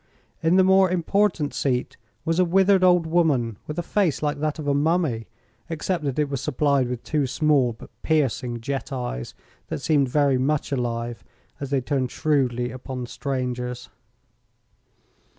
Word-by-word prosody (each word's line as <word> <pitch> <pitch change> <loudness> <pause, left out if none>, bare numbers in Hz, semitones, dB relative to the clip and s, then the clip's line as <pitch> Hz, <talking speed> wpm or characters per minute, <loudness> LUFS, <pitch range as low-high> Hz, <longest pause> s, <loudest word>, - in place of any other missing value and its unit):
In 165 +2 +3
the 190 - +6
more 190 0 +5
important 180 -2 +1
seat 125 -3 -1 0.3
was 165 +1 +1
a - - +6
withered 190 +2 +4
old 180 -2 +5
woman 150 - +1
with 150 - -5
a 175 - -1
face 170 -7 0
like 145 -1 -1
that 155 +1 -1
of 150 -2 -5
a 140 - +3
mummy, 145 -6 +1 0.4
except 165 +1 -2
that 135 -3 -2
it 150 -1 +2
was 140 -2 -3
supplied 140 -2 +1
with 125 -1 -5
two 150 -3 0
small 140 -4 +2
but 110 - -14
piercing 125 -6 0
jet 135 +2 -4
eyes 125 - -4 0.3
that - - -3
seemed 140 -2 +2
very 140 -1 +2
much 145 +3 0
alive 120 -2 -2 0.4
as 140 - -5
they 135 -1 +1
turned 130 0 -1
shrewdly 125 -6 0
upon 130 0 -6
the 120 - -8
strangers. 125 -3 -3
140 Hz, 165 wpm, -24 LUFS, 125-160 Hz, 0.4 s, the